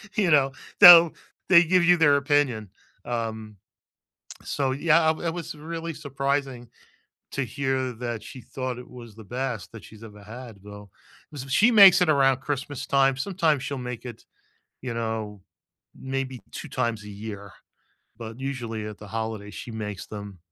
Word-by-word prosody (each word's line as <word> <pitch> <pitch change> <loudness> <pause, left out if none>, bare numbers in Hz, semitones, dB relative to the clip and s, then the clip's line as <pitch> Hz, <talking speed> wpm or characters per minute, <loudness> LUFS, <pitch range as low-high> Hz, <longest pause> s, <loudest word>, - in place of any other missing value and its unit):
you 195 -5 +2
know? 135 -2 +4 0.3
They'll 170 -4 +10 0.4
they 175 -2 +8
give 180 +1 +2
you 175 0 +5
their 145 -3 +4
opinion, 140 -8 0 0.4
um 110 -3 -5 0.9
so, 135 -2 -1
yeah, 165 +4 +3
w 160 +2 -1
it 165 - 0
was 170 -2 -6
really 165 +1 -6
surprising 135 -3 -3 0.6
to 140 - -2
hear 130 0 -2
that 120 -2 -5
she 130 - -11
thought 130 0 -6
it 125 - -11
was 120 -4 -12
the 110 - -12
best 125 -1 -5
that 110 -3 -11
she's 110 0 -15
ever 105 -2 -12
had, 115 0 -11
though. 105 0 -12 0.4
Was 140 -3 -8
b 135 - -12
She 220 - +4
makes 195 -5 +8
it 180 - +2
around 135 -3 +3
Christmas 145 0 -5
time, 135 -1 +2
sometimes 160 -4 0
she'll 140 0 -4
make 125 -1 -7
it, 120 -2 -10 0.6
you 125 -2 -5
know, 110 -3 -4 0.6
maybe 130 -1 -4
2 - - -8
times 120 -4 -2
a 105 - -10
year, 100 -1 -8 0.7
but 115 +2 -9
usually 120 -6 -5
at 105 -1 -8
the 105 - -12
holidays 110 -2 -5
she 120 - -8
makes 105 -3 -6
them, 100 -3 -9
130 Hz, 165 wpm, -25 LUFS, 110-145 Hz, 0.9 s, They'll